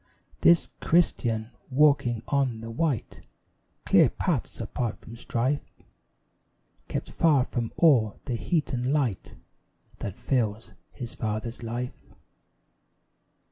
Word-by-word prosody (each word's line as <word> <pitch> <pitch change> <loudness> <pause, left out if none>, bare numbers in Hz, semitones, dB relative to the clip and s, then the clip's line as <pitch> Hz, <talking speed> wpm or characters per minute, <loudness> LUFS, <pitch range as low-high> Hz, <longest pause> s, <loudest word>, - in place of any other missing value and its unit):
This 170 -1 +5
Christian, 120 -9 +1 0.2
walking 135 -5 +3
on 130 -5 0
the 115 0 -6
white 140 -1 -2 0.6
Clear - - +6
paths - - -2
apart 120 -3 -3
from 115 - -11
strife, 125 +4 -1 1.3
Kept - - -4
far 150 -6 +4
from 120 -2 -3
all 125 - +4
the 125 - -2
heat 155 +5 -1
and 125 +1 0
light 135 -10 -1 0.7
That 100 - -5
fills 115 -4 -1 0.2
his 120 -3 -7
father's 110 +2 -4
life. 120 +2 -6
120 Hz, 105 wpm, -27 LUFS, 115-140 Hz, 1.3 s, Clear